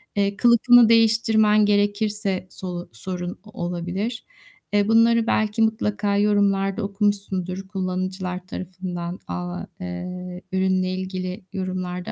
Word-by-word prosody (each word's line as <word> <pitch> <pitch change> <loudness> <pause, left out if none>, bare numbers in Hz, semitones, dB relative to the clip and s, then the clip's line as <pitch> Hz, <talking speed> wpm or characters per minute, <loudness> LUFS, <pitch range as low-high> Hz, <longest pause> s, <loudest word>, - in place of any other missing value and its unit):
Eee, 200 0 +1
kılıfını 240 0 +6
değiştirmen 220 -2 +4
gerekirse 205 -2 0
solu 180 -2 -6
sorun 180 +8 -5
o 210 -5 -8
olabilir. 180 +7 -3 0.5
Eee, 205 0 +3
bunları 230 +1 +4
belki 215 +1 +1
mutlaka 210 -2 +1
yorumlarda 200 0 +2
okumuşsundur 195 -2 -2
kullanıcılar 185 -1 -3
tarafından, 180 -1 -5
aaa, 180 0 -4 0.2
eee, 180 0 -6
ürünle 185 -1 +1
ilgili 185 +1 -4
yorumlarda 185 -1 -4
195 Hz, 105 wpm, -23 LUFS, 185-210 Hz, 0.5 s, kılıfını